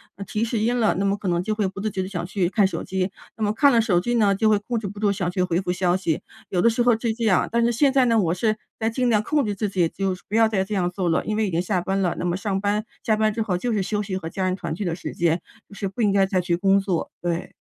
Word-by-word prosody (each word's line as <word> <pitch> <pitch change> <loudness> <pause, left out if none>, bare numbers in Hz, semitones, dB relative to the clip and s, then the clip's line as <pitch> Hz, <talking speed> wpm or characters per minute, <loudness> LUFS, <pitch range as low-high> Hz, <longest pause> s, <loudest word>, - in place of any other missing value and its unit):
呃， 200 - -7
提 210 +4 -2
示 230 -1 -1
音 235 +3 +1
了， 220 - +3
那 195 - 0
么 200 0 +2
可 205 - -6
能 175 -1 +1
就 215 +3 -1
会 210 -2 0
不 195 +1 -7
自 215 - -1
觉 190 - -2
地 - - -5
想 180 -3 -4
去 180 -1 -1
看 205 -1 +3
手 - - -4
机。 190 0 -2 0.3
那 220 - -2
么 205 - +2
看 280 +6 +5
了 235 - +4
手 195 -6 +2
机 240 +7 -1
呢， 205 -4 +3
就 220 +2 +1
会 210 -1 +3
控 235 +3 -3
制 210 - -5
不 205 +1 -8
住， 205 -2 +2
想 190 -3 -1
去 185 0 -1
回 180 -1 0
复 180 -1 -2
消 180 0 +1
息， 175 -1 -1 0.3
有 180 -2 +1
的 230 - +5
时 235 +1 +1
候 245 - +5
是 230 -2 0
这 230 +1 -5
样。 190 -5 +3
但 235 0 +2
是 235 - +3
现 275 +4 +3
在 265 -2 +4
呢， 230 -2 +3
我 175 -5 +1
是 215 +4 +1 0.2
在 225 0 +1
尽 250 +1 0
量 215 -2 +3
控 295 +2 +1
制 205 - -2
自 205 +1 -2
己， 180 -4 +1
就 195 0 -2
不 210 - -2
要 225 -1 +5
再 200 -4 0
这 205 +2 -4
样 180 -2 +1
做 180 -1 -2
了， 165 - +1
因 215 - -1
为 220 -2 +1
已 - - -3
经 165 - 0
下 185 0 0
班 195 +2 -1
了， 180 -3 0
那 - - -2
么 175 0 0
上 195 -1 -2
班 210 +1 0 0.2
下 220 - +2
班 215 0 +2
之 230 - -2
后 195 -5 0
就 240 +6 -2
是 205 - +1
休 210 +2 -1
息 195 -2 -3
和 165 -3 -5
家 190 +3 -3
人 185 - 0
团 185 - -4
聚 205 - -4
的 170 - -1
时 175 - -6
间， 170 0 +1 0.3
就 - - -14
是 200 -1 -3
不 195 +5 -5
应 205 - +3
该 195 -1 +4
再 190 -1 +1
去 175 -1 0
工 195 +2 +3
作， 190 -4 -2
对。 175 -1 -3
200 Hz, 355 characters per minute, -23 LUFS, 185-220 Hz, 0.3 s, 看